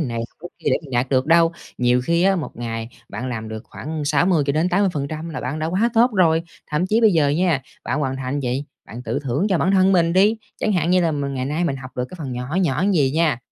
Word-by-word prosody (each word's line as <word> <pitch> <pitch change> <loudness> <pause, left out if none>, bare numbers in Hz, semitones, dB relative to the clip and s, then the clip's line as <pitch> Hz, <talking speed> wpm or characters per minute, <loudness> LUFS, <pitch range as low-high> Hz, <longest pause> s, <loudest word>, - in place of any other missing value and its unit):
này, 125 -7 -2
học - - -36
cái 175 - -7
kia - - -1
để - - +4
mình 145 - -12
đạt 125 +1 0
được 130 -1 +1
đâu. 165 +1 +5 0.3
Nhiều 125 0 +3
khi 170 +4 +2
á, 195 0 +4
một 155 - -5
ngày 115 -1 -4 0.2
bạn 130 - -5
làm 110 -3 -4
được 110 0 -6
khoảng 155 0 -6
60-80% 155 +1 +1
là 155 - -5
bạn 140 +5 -3
đã 155 - -1
quá 195 +8 +1
tốt 240 +3 +5
rồi! 165 -4 +3 0.3
Thậm 160 +5 0
chí 220 +4 +2
bây 220 -4 +5
giờ 155 -4 +3
nha, 160 -2 +1 0.2
bạn 140 - -1
hoàn 135 -2 -1
thành 135 +2 -3
gì, 130 +2 -2 0.2
bạn 120 +2 -8
tự 120 +3 -2
thưởng 140 - 0
cho 185 -4 +2
bản 190 - +2
thân 190 0 +4
mình 170 -2 +3
đi! 205 +4 +4 0.2
Chẳng 215 - +1
hạn 175 -2 +1
như 185 0 +4
là 165 -2 +1
mình 140 -1 -3
ngày 130 0 -2
nay 150 +5 -1
mình 140 -5 -1
học 130 -1 -9
được 125 - -1
cái 185 - -10
phần 135 -5 -5
nhỏ 125 +7 -4
nhỏ 150 +2 +1
vầy 140 -5 +3
nha, 155 -4 +1
155 Hz, 255 wpm, -21 LUFS, 130-175 Hz, 0.3 s, đâu